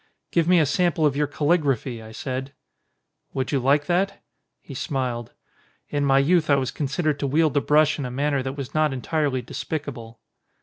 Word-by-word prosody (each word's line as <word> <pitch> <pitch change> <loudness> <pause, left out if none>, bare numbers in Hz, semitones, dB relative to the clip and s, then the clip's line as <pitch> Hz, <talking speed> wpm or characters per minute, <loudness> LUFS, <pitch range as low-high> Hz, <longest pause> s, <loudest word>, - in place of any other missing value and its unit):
"Give 170 -1 +2
me 180 -1 +5
a 155 - +4
sample 160 +1 +1
of 145 -2 +2
your 150 0 +1
calligraphy," 140 -6 0
I 110 0 -11
said. 130 +3 -5 0.8
"Would 130 -1 -1
you 140 - +2
like 140 +3 +2
that?" 180 +5 0 0.4
He 140 - -11
smiled. 125 -4 -3 0.6
"In 145 -1 0
my 135 -1 +4
youth 155 +3 +3
I 140 - +6
was 130 -2 -1
considered 150 +1 -1
to 140 - -1
wield 155 +2 +2
the 145 - +2
brush 150 +1 +3
in 140 - -2
a - - -3
manner 140 +2 0
that 130 +2 -5
was 140 0 -6
not 155 -2 +2
entirely 135 -1 -1
despicable." 120 -4 -6
140 Hz, 185 wpm, -24 LUFS, 130-155 Hz, 0.8 s, I